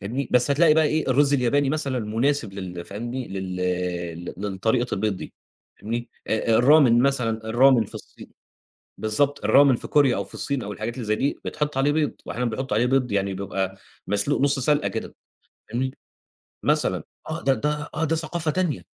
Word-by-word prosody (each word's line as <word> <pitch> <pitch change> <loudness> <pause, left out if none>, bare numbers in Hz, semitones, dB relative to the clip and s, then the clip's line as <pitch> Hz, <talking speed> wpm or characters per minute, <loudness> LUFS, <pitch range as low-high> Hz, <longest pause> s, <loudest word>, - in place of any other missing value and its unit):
فاهمني، 120 +7 -3
بس 125 +3 +4
هتلاقي 155 +2 +5
بقى 160 -1 +4
إيه 155 -1 0
الرز 145 +2 +3
الياباني 135 +2 +2
مثلًا 140 -5 0
مناسب 115 +3 0
لل 90 -3 -7
فاهمني 120 +5 -5
لل 90 -2 -3
للطريقة 105 +5 -1
البيض 100 -1 -1
دي - - -9 0.5
فاهمني، 120 +2 -4 0.2
الRamyeon 120 +5 +4
مثلًا 125 -5 +1
الRamyeon 120 -2 +5
في - - -9
الصين - - -11 0.7
بالضبط 140 +7 0
الRamyeon 140 -2 +6
في - - -7
كوريا 140 -6 +3
أو 100 - -2
في - - -9
الصين 140 -4 -2
أو 105 - -5
الحاجات 110 +3 -5
اللي 125 -3 -5
زَي 110 - +1
دي 140 - -1
بيتحط 150 -2 -3
عليه 145 +2 +2
بيض 150 -1 0
وأحيانًا 125 0 -2
بيحطوا 115 -1 -2
عليه 120 +3 +3
بيض 125 -3 +1
يعني 100 -1 0
بيبقى 95 0 -3 0.3
مسلوق 105 +8 +1
نُص 140 0 +3
سلقة 145 +3 +1
كده - - -6 0.6
فاهمني، 130 +3 -3 0.7
مثلًا - - +1 0.3
آه 165 +1 -4
ده، 135 - +3
ده 150 +1 -2
آه 155 +1 -1
ده 165 - +1
ثقافة 160 0 -1
تانية 150 - -1
125 Hz, 175 wpm, -24 LUFS, 105-145 Hz, 0.7 s, الRamyeon